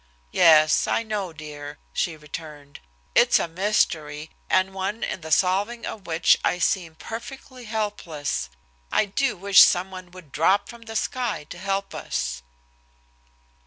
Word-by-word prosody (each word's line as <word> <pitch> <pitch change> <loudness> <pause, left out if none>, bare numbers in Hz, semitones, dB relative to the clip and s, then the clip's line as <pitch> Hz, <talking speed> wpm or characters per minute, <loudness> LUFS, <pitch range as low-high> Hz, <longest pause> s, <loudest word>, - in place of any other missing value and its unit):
"Yes, 155 -2 +5
I - - +1
know, 210 -5 -3
dear," 150 -2 -9 0.2
she 165 -2 -1
returned. 150 -1 -9 0.3
"It's - - +5
a - - -1
mystery, 165 -5 -1 0.2
and 185 0 +2
one 195 +3 -3
in - - -3
the 160 0 -8
solving 200 +8 +1
of 200 -5 -7
which 165 0 +3
I - - +1
seem 170 -2 0
perfectly 250 - -9
helpless. 205 - -3 0.4
I - - +3
do 205 +3 -1
wish 195 +2 +6
someone 185 0 +3
would 180 -5 -14
drop 185 +9 +2
from 235 -1 -11
the 225 - -6
sky 245 -7 -2
to - - -7
help 195 +1 -2
us." - - -3
185 Hz, 140 wpm, -24 LUFS, 155-205 Hz, 0.4 s, wish